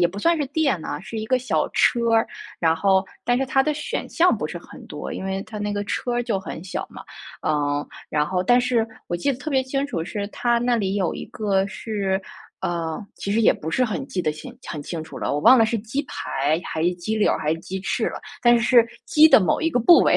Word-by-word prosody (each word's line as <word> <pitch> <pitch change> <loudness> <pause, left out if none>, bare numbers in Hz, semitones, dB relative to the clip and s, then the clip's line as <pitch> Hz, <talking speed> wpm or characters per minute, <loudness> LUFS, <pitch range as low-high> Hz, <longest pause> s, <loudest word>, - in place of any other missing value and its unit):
也 175 - +4
不 195 +4 -8
算 335 +9 +3
是 290 - -1
店 275 - 0
啊， 145 - -4
是 220 +4 -6
一 215 - -4
个 255 +2 +2
小 255 +1 0
车 235 -2 +3
儿， 225 - +3 0.3
然 165 -1 +3
后 190 +3 +3 0.2
但 245 0 +2
是 270 - +1
它 270 0 +2
的 300 +1 0
选 295 - -4
项 355 +1 +3
不 - - -3
是 - - -7
很 - - -11
多， - - -6
因 - - -5
为 195 0 -2
它 215 - -8
那 205 0 -2
个 205 0 -2
车 245 +3 -2
儿 240 - +1
就 215 -5 -1
很 175 -3 -7
小 185 - -4
嘛。 - - -11 0.4
嗯， 145 -1 0 0.2
然 150 0 +1
后 180 +2 -1
但 245 +6 +4
是 245 -2 +1 0.2
我 - - -3
记 175 +11 0
得 255 - -2
特 310 - -5
别 265 -2 +2
清 275 +2 -2
楚， 165 -12 -3
是 200 +3 -4
它 240 +2 0
那 240 0 +1
里 195 -3 -1
有 190 -4 0
一 - - -7
个 195 -2 0
是 195 -1 -2 0.4
呃， 165 -2 -2 0.2
其 200 - -4
实 225 +2 +2
也 - - +6
不 160 - -6
是 255 +8 +2
很 245 +4 -3
记 180 - -2
得 155 - 0
清 155 - -9 0.2
很 150 -3 -5
清 160 +1 -5
楚 160 - -9
了， - - -2
我 145 - 0
忘 260 +10 +7
了 225 - +5
是 230 0 -1
鸡 240 +7 -3
排 150 - -1
还 160 - -3
是 175 +2 +2
鸡 180 +5 -3
柳 210 - +3
儿 - - -1
还 155 +1 0
是 165 - -4
鸡 190 +1 -5
翅 220 +3 -1
了， - - -6 0.2
但 240 0 +6
是 235 - -1
是 235 -2 +5 0.2
鸡 310 +1 +6
的 - - +8
某 180 - +1
一 325 - +2
个 250 - 0
部 335 +9 +7
位。 - - +4
210 Hz, 285 characters per minute, -23 LUFS, 175-245 Hz, 0.4 s, 的